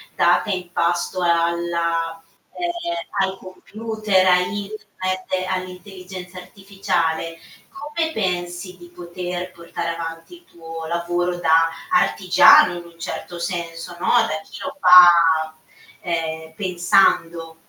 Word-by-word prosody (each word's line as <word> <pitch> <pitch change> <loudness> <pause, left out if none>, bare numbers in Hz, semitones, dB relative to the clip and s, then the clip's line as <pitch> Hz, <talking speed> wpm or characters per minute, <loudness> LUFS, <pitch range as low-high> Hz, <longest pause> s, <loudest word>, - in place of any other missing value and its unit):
data - - +2
in 180 -3 -4
pasto 175 +1 -1
alla 170 -1 0 0.3
ehm, 345 - -3
ai 190 - -8
computer, 210 +1 -2
a 180 -1 +6
internet, 185 -1 -4
all'intelligenza 185 0 -7
artificiale, 175 -4 -3 0.6
come 320 -1 0
pensi, 180 - -3
di 175 -1 -14
poter 180 +1 -6
portare 170 -1 -6
avanti 165 - -8
il 345 0 -20
tuo 165 - -9
lavoro 175 +1 -1
da 165 -1 +3 0.2
artigiano, 360 - +5
in 175 - -8
un 170 -1 -17
certo 175 +1 -6
senso, 170 0 -5
no? 185 - -3
Da 225 -10 +2
chi - - -12
lo 280 0 -6
fa, 170 - +6 0.5
ehm, 160 -2 -4
pensando? 175 -3 +1
180 Hz, 110 wpm, -21 LUFS, 170-190 Hz, 0.6 s, a